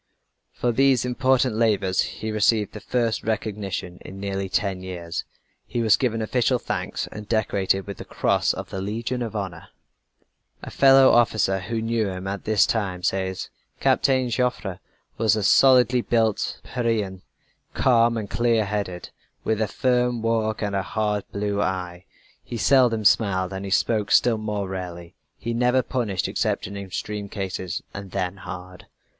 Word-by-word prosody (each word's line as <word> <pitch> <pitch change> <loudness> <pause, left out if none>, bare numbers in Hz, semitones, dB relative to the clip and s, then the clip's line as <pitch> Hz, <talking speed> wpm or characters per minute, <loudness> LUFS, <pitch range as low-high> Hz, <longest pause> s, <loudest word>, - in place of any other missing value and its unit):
For 120 - -1
these 130 0 +3
important 130 -1 +2
labors 100 -5 +2
he 110 - -4
received 110 0 +2
the - - -7
first 120 -3 -1
recognition 100 -5 -3
in 95 - -10
nearly 100 -1 -3
ten 95 -1 -1
years. 85 -2 -5 0.4
He 120 -2 -2
was 110 -1 +6
given 115 -4 -1
official 125 +3 +1
thanks, - - -3
and 105 0 -9
decorated 100 -3 +1
with 100 -2 -7
the - - -7
cross - - +1
of - - -6
the 95 - -4
Legion 115 +5 -3
of 115 -2 -4
Honor. 100 -4 -5 1.0
A - - -7
fellow 135 -1 +6
officer 110 -5 +3
who 110 +4 -3
knew 115 -1 0
him 95 0 -6
at 95 0 -4
this 105 -2 +4
time 95 -5 -2
says: 95 0 -2 0.3
"Captain 130 -2 +2
Joffre 110 -6 -1 0.4
was 110 -1 +3
a 110 - -1
solidly 125 +2 +5
built 115 -3 0
Pyrenean, 110 -6 -2 0.5
calm 115 -2 +3
and 105 -2 -4
clear 115 0 +1
headed, 100 -3 -4 0.3
with 110 0 0
a 110 - +1
firm 125 0 0
walk 110 -1 0
and 100 -1 -1
a 95 - +1
hard 105 0 -1
blue 100 0 -1
eye. 90 -2 -3 0.4
He 120 - -6
seldom 120 -4 +3
smiled 100 -3 +3
and 95 +1 -5
he - - -4
spoke 105 +1 +1
still 115 -3 +4
more 105 -2 -3
rarely. 90 -2 -6 0.2
He 115 - -4
never 125 +2 +2
punished 110 -8 -1
except - - -1
in 100 - -7
extreme 100 +1 -5
cases, 95 -2 -4
and 100 -1 -7
then 95 0 -3
hard. 90 -1 -9
105 Hz, 160 wpm, -24 LUFS, 95-115 Hz, 1.0 s, was